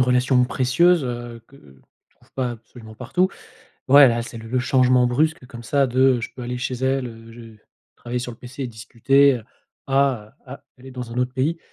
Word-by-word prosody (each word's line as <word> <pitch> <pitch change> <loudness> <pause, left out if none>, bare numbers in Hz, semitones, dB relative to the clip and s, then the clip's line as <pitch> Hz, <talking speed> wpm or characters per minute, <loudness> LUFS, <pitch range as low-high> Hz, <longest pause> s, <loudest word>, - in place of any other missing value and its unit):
relation 125 0 +3
précieuse, 135 +6 +2
heu, 120 -1 -6
que 140 - -19
tu 65 - -23
trouves - - -28
pas 130 -2 -2
absolument 115 -1 -13
partout. 180 +11 0 0.6
Ouais, 140 0 +8
là, 120 0 -1
c'est 115 -1 -9
le 115 0 -10
le 130 - -1
changement 125 -1 +3
brusque 155 +4 0
comme 120 -1 -11
ça 140 +4 +1
de, 130 +1 -1 0.2
heu: 120 - -4
«Je - - -5
peux 130 - -10
aller 125 +1 -4
chez 130 +1 -4
elle, 130 0 -1
heu, 115 0 -12
je 120 - -13
vais 115 -2 -14 0.4
travailler 120 +1 -5
sur 125 0 -5
le 115 - -15
PC 130 +2 -8
et - - -2
discuter», 125 +5 +2
heu, 115 - -6 0.4
à, 135 -6 +1
heu: - - -25
«Ah, 135 +2 -11
elle 130 - -15
est 130 - -9
dans 125 -2 -7
un 125 - -4
autre 125 +1 -1
pays», 150 +6 -1
125 Hz, 225 wpm, -22 LUFS, 120-135 Hz, 0.6 s, Ouais